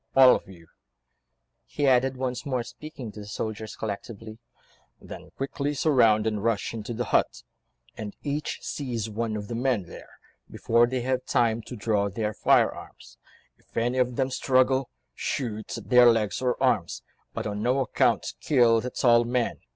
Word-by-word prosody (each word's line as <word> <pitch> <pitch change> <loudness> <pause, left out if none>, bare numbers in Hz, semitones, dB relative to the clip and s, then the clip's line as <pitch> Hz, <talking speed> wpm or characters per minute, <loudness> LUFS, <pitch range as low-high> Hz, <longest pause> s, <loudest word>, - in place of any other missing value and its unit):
All 130 -1 +8
of - - -6
you," 85 -3 -14 1.0
he 145 - -2
added, 130 0 +3
once 125 -1 -3
more 130 -4 -2
speaking 140 -3 -9
to 105 - -11
the 105 - -9
soldiers 110 +1 -5
collectively, 110 +1 -7 0.6
"then - - -11
quickly 140 +2 -2
surround 115 -8 +3
and 105 -2 -1
rush 115 -2 0
into 115 +1 -5
the 120 - -1
hut, - - +1 0.5
and 105 -1 -7
each 145 +1 -3
seize 120 -6 -4
one 110 0 -2
of 105 -1 -6
the 120 - -5
men 120 -3 0
there, 85 - -12 0.4
before 115 +1 +2
they 130 0 -2
have 130 +1 -1
time 115 -1 +1
to 125 - -7
draw 105 -2 0
their 105 +2 -3
firearms; - - 0 0.4
if - - -17
any 120 +3 +1
of 125 -1 +1
them 130 +1 0
struggle, 130 0 +2 0.2
shoot 110 - -4
at - - -10
their 125 -1 +8
legs 110 -1 -1
or 125 -1 0
arms, - - 0 0.3
but - - -3
on 105 0 -3
no 125 +4 +1
account 130 - +1
kill 120 -6 +4
the 125 - -4
tall 120 -1 +4
man. 120 0 -1
120 Hz, 165 wpm, -26 LUFS, 110-130 Hz, 1.0 s, All